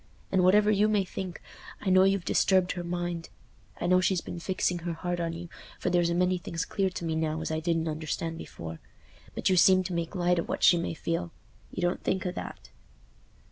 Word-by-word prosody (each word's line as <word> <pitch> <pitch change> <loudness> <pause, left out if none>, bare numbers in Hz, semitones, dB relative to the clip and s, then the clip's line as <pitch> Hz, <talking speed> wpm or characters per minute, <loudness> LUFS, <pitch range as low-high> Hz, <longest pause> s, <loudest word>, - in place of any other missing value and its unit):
And 190 -1 +3
whatever 210 +3 +5
you 210 +1 +3
may 210 -3 +2
think, 185 -1 -6 0.4
I 190 - -1
know 185 +1 +6
you've 195 -2 +1
disturbed 185 -2 +3
her 175 - -4
mind. 175 -1 -3 0.5
I - - -2
know 185 +1 +4
she's 185 -1 +2
been 170 - -7
fixing 180 0 -1
her 170 0 -3
heart 175 +1 -3
on 165 -1 -2
you, 170 +1 -7 0.3
for - - -1
there's 175 -1 +3
a 170 - 0
many 180 +1 +2
things 165 0 -4
clear 195 -2 0
to 175 -2 -6
me 160 - -1
now 160 0 -1
as 160 - -3
I 155 - 0
didn't 165 0 0
understand 160 +1 -3
before. 80 -1 -8 0.6
But - - +1
you 185 - +3
seem 185 +1 +6
to 185 0 -4
make 170 +2 -3
light 180 -1 +2
o' - - 0
what - - -3
she 175 - +7
may 170 - -3
feel—you 170 +2 -6
don't 175 +1 0
think 190 0 -1
o' 180 - 0
that." - - -8
175 Hz, 215 wpm, -28 LUFS, 165-185 Hz, 0.6 s, she